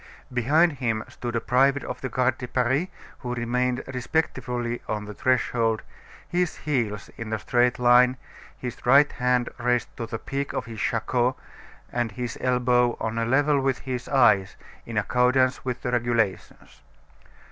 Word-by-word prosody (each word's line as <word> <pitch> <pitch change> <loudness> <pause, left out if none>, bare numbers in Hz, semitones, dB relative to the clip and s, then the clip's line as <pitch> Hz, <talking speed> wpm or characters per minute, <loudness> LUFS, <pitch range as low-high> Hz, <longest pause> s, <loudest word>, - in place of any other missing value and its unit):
Behind 150 +8 +3
him 115 -4 -1
stood 120 -1 -6
a - - +2
private 135 +4 +2
of - - -6
the 130 - -3
Garde 130 +1 +1
de 125 - -5
Paris 130 +7 +1 0.3
who 125 -1 -4
remained 125 +2 -1
respectfully 125 -3 -2
on 105 -1 -3
the 105 - -7
threshold, 115 -2 +1 0.4
his 175 -1 -1
heels 115 -8 -2
in 115 -1 -6
a 110 - 0
straight 125 +2 +1
line, 125 +1 +5 0.4
his 125 -1 -7
right 140 +4 +5
hand 125 -1 +1
raised 125 0 0
to 115 - -4
the 115 0 -4
peak 140 +4 -4
of - - -3
his 115 -2 -8
shako, 120 +2 0 0.6
and 120 -3 -2
his 120 +1 -4
elbow 125 -1 +2
on 115 +1 -2
a 115 - 0
level 140 +3 +3
with 135 -2 +1
his 125 -2 -4
eyes, 115 -8 +4 0.3
in 115 -2 -5
accordance 125 +5 +2
with 125 -2 -4
the 125 - -1
regulations. 115 -5 -2
125 Hz, 160 wpm, -25 LUFS, 115-130 Hz, 0.6 s, line